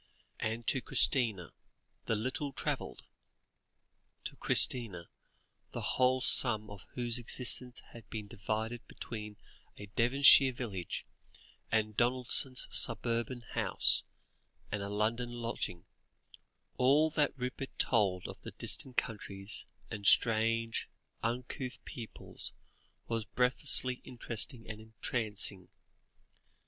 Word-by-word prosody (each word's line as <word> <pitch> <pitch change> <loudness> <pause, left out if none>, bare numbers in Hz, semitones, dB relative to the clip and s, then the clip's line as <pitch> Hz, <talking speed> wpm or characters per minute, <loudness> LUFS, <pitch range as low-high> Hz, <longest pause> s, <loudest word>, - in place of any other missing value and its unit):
And 110 +1 -3
to 135 - +2
Christina, 110 -12 +3 0.5
the 115 - +1
little 130 +5 -3
travelled - - -4 1.2
to - - -6
Christina, 105 -9 +3 0.6
the - - -3
whole 130 0 +3
sum 110 -5 +3
of 100 -2 -11
whose 120 -1 +2
existence 125 +1 -2
had 115 - -14
been 110 -2 -6
divided 110 +4 -4
between 105 -2 -8 0.4
a 105 - -8
Devonshire 135 +2 +6
village, 100 -9 -6 0.7
the 110 -1 +3
Donaldsons' 125 +4 +1
suburban 115 +2 +1
house, - - +2 0.7
and 105 - -2
a 100 - -4
London 110 +4 -1
lodging 115 -7 -5 0.9
all 145 +5 +3
that 150 -2 0
Rupert 130 +1 -6
told 100 -6 +1
of - - -10 0.2
distant 130 -2 0
countries, 100 -3 -3 0.3
and 100 -2 -4
strange, 115 0 +2 0.3
uncouth 125 +2 -3
peoples 115 -3 -9 0.5
was 115 -1 -2
breathlessly 125 +1 +3
interesting 120 -1 -3
and 110 -1 -8
entrancing. 105 -4 -1
115 Hz, 100 wpm, -32 LUFS, 105-125 Hz, 1.2 s, Devonshire